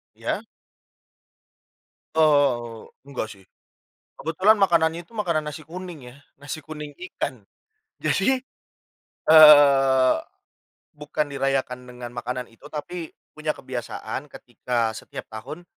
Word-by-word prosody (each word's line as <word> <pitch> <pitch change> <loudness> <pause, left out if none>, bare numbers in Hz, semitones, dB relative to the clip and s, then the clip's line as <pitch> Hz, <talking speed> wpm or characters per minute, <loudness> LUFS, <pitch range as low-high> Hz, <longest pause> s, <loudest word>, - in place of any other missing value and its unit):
Ya. - - -3 1.7
Oh, 135 -7 +2 0.2
enggak 125 -5 -4
sih. 95 -2 -14 0.8
Kebetulan 190 +8 +3
makanannya 170 -3 +3
itu 230 - -18
makanan 170 -7 0
nasi 150 +1 -7
kuning 165 -6 -9
ya. 130 - -16 0.2
Nasi 140 +3 -7
kuning 150 -1 -8 0.2
ikan. 125 -8 -5 0.5
Jadi, 260 0 +2 0.9
eee, 140 -4 +8 0.8
bukan 150 0 -2
dirayakan 135 -2 -1
dengan 125 -1 -9
makanan 125 +1 -4
itu 115 +6 -16
tapi 160 +3 -6 0.2
punya 155 0 -5
kebiasaan 130 +1 -6
ketika 120 -2 -2
setiap - - -8
tahun 145 +11 -8
145 Hz, 105 wpm, -24 LUFS, 125-155 Hz, 1.7 s, eee